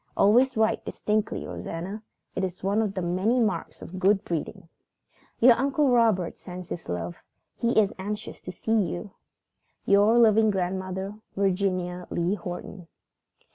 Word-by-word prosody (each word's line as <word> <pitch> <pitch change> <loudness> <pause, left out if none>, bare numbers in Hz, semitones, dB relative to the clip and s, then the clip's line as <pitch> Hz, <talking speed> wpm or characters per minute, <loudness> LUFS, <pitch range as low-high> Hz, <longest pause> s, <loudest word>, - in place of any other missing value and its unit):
Always 245 +5 +4
write 220 0 +2
distinctly, 215 0 -2
Rosanna. 190 +6 -6 0.3
It 190 - -2
is 185 -1 -4
one 200 +3 +2
of 210 -2 -2
the 185 - -2
many 190 +8 +1
marks 220 -3 -1
of 185 +2 -7
good 195 +2 +3
breeding. 165 0 -4 0.7
"Your 245 +1 +8
Uncle 275 +4 +1
Robert 220 -8 +2
sends 180 -1 -9
his 175 - -6
love. 85 0 -4 0.4
He 235 -1 +2
is 205 -2 +2
anxious 210 +2 -5
to 180 - -6
see 200 +5 -5
you. 180 +2 -4 0.7
"Your 205 +4 +5
loving 220 -2 +5
grandmother, 190 +1 -3 0.2
"VIRGINIA 185 -2 0
LEE 175 +3 0
HORTON." 180 -1 -7
195 Hz, 140 wpm, -26 LUFS, 180-220 Hz, 0.7 s, Your